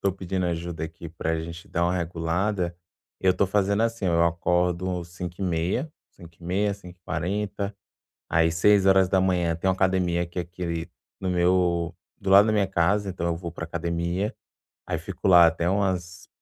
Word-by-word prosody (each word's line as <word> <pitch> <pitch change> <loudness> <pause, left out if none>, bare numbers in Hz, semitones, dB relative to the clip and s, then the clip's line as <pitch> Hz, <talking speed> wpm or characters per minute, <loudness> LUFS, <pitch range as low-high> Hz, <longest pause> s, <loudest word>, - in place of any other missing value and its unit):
tô 100 -1 +1
pedindo 95 -1 -2
ajuda 85 -1 -3
aqui 85 +1 -8
pra 80 0 -2
gente 85 +1 -8
dar 85 - 0
uma 90 +1 +1
regulada. 85 +2 -1 0.4
Eu 95 -1 +4
tô 100 - +2
fazendo, 100 +2 +1
assim, 115 -4 -1
eu 85 -1 +3
acordo 90 +1 0
cinco 85 0 -7
e - - -1
meia 90 - -1 0.2
cinco 85 -2 -15
e - - -13
meia, 100 +4 +1
5h40, 100 +2 -4 0.5
aí 80 0 +3
6h 95 -1 +3
tem 85 +3 -1
uma 95 - +3
academia 95 -2 +1
aqui 85 +1 -6
aqui 85 -1 -4 0.3
no 95 - -2
meu 90 -1 +2 0.2
do 95 - -3
lado 100 +2 +8
da 110 - +2
minha 105 -2 +2
casa. 95 +3 +1
Então 85 -2 -3
eu 85 -1 0
vou 85 -1 -6
pra 85 - -6
academia, 85 +5 -2 0.5
aí - - -1
fico - - -6
lá 90 -3 +8
até 85 +1 0
umas 90 -3 -1
90 Hz, 170 wpm, -25 LUFS, 85-95 Hz, 0.5 s, lado